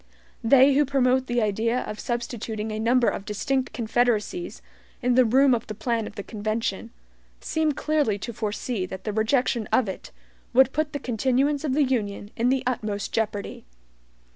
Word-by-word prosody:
They 270 +4 +6
who 290 +2 +4
promote 260 -2 +2
the 240 -1 +1
idea 225 +4 0
of 210 - -6
substituting 230 -2 -4
a 215 - -3
number 240 +2 +3
of - - -1
distinct 260 +6 -1
confederacies 240 - -1 0.4
in 250 0 +3
the 255 0 +5
room 260 +3 +4
of 230 -2 -1
the 215 - -6
plan 230 0 -1
of - - -11
the 200 - -5
convention, 215 0 -3 0.5
seem 315 -2 0
clearly 295 -8 0
to 235 +4 -6
foresee 210 -1 -3
that 190 0 -8
the 210 - -3
rejection 225 +1 +1
of 255 - +3
it 190 - -6 0.4
would 265 +1 +5
put 310 -1 -1
the 285 - -2
continuance 265 +5 0
of 275 -4 0
the 300 - +4
Union 210 -6 -2
in 235 +2 +1
the 265 0 +1
utmost 215 -5 -2
jeopardy. 210 -2 -2
240 Hz, 170 wpm, -25 LUFS, 215-265 Hz, 0.5 s, They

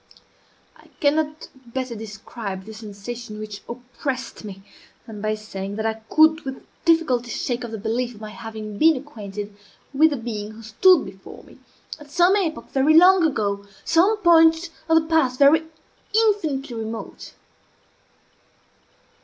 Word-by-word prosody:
I - - -20
cannot 305 +1 0
better 255 0 -5
describe 205 -2 -7
the 220 - -9
sensation 215 +1 -8
which 210 -1 -7
oppressed 250 +2 -5
me 195 -2 -9 0.4
than 215 -2 -9
by 215 0 0
saying 200 -2 -6
that 220 +1 -3
I 220 0 -2
could 315 +1 +5
with 265 -3 -7 0.2
difficulty 300 -8 +2
shake 245 +1 -3
off 240 - -5
the 220 - -5
belief 235 +3 -2
of 210 - -15
my 215 -1 -7
having 215 0 -8
been 320 0 +6
acquainted 210 -7 -8 0.4
with 310 +4 +5
the 290 - -3
being 215 -3 -5
who 225 +1 -12
stood 335 - +4
before 190 0 -12
me, - - -18 0.4
at 295 -1 -14
some 350 +6 +4
epoch 340 -6 -2
very 275 +3 +3
long 365 +2 +7
ago 200 -7 -2 0.2
some 365 +7 +3
point 330 -2 +4 0.2
of 325 0 +6
the 315 - -6
past 285 -6 +2
even 315 +3 +5 0.5
infinitely 320 - +1
remote. 225 0 -7
245 Hz, 145 wpm, -23 LUFS, 215-315 Hz, 0.5 s, long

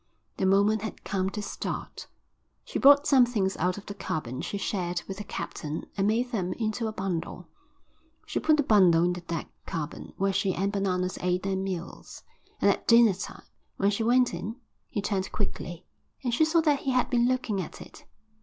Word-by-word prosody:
The 190 - +1
moment 200 +2 +3
had 220 - -6
come 190 -2 -1
to 210 +1 -5
start. - - -5 0.6
She - - -3
brought 285 +1 +7
some 265 -3 +6
things 205 -6 0
out 180 +3 0
of 205 - -9
the 205 - -6
cabin 155 -10 -4
she 200 - -3
shared 180 -3 -2
with 195 - -5
the 205 - -5
captain 155 -5 -5
and 195 0 +1
made 240 +3 +1
them 185 -6 -1
into 220 +1 -2
a - - -2
bundle. 190 -5 -4 0.8
She - - -2
put 310 -1 +3
the 295 - +3
bundle 185 -8 +5
in 180 0 +2
the 175 - -6
deck 170 -2 -5 0.2
cabin 160 -3 -5
where 195 0 +1
she 190 -1 +1
and 195 +2 0
Bananas 185 -2 -1
ate 180 0 0
their 195 0 0
meals, 190 -3 -5 0.4
and - - +5
at - - -4
dinner 230 -3 +7
time, - - -8 0.3
when 200 +1 +2
she 205 - -2
went 245 0 +3
in, 200 +6 -4 0.3
he 205 - -3
turned 195 -2 -1
quickly 175 -4 -4 0.4
and 245 -2 -1
she 315 +7 +4
saw 325 +1 +3
that 295 -3 +2
he 270 - -1
had 250 0 +1
been 240 -1 +3
looking 250 -6 0
at 175 - -8
it. - - -13
200 Hz, 200 wpm, -28 LUFS, 180-230 Hz, 0.8 s, brought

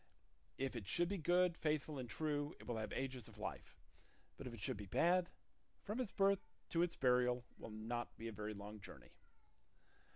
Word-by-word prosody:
If 135 -1 -1
it 110 -6 -4
should 175 0 +3
be 200 -1 0
good, 175 +1 +4
faithful, 150 -2 0
and 125 -2 -4
true, 145 +3 0
it - - -11
will 120 -2 -1
have 110 - -2
ages 130 -4 -2
of - - -13
life; - - -5 0.6
but 135 - -6
if 120 - -5
it - - -10
should 120 +3 -1
be 100 -1 -6
bad, 175 - +4 0.5
from 210 +4 -2
its 245 -6 0
birth 195 0 +3 0.2
to 165 - +3
its 175 -1 +2
burial 125 -1 +4
will - - -6
not 115 +3 -3
be 115 - -4
a - - -3
very 105 0 -4
long 105 +1 -7
journey." - - -11
130 Hz, 195 wpm, -41 LUFS, 115-170 Hz, 0.6 s, good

